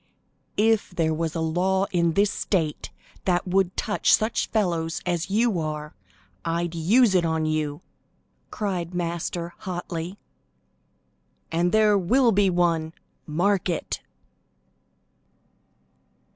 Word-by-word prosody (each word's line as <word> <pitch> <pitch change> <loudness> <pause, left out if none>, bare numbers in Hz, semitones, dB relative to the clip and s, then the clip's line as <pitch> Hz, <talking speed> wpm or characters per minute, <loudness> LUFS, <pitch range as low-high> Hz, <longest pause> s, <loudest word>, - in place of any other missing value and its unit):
"If 220 0 +3
there 160 -3 +1
was 165 +1 -2
a 165 - -1
law 185 +4 +1
in 170 -3 +2
this 200 +2 +3
state 160 -7 -1 0.4
that 180 0 +1
would 190 0 +1
touch 210 - +3
such 220 +2 -1
fellows 170 -6 0
as 175 0 -1
you 215 -2 +2
are, 150 -1 -4 0.5
I'd 170 0 -1
use 200 +7 +4
it 180 -2 +3
on 160 -1 0
you," 155 0 -1 0.7
cried 180 -4 -3
Master 170 0 -3
hotly, 175 0 -5 1.3
"and 170 +2 +1
there 215 -2 +4
will 240 +7 +3
be 200 -1 +3
one; 170 -2 +1 0.3
mark 180 +5 +1
it!" 170 - -3
175 Hz, 115 wpm, -25 LUFS, 165-195 Hz, 1.3 s, use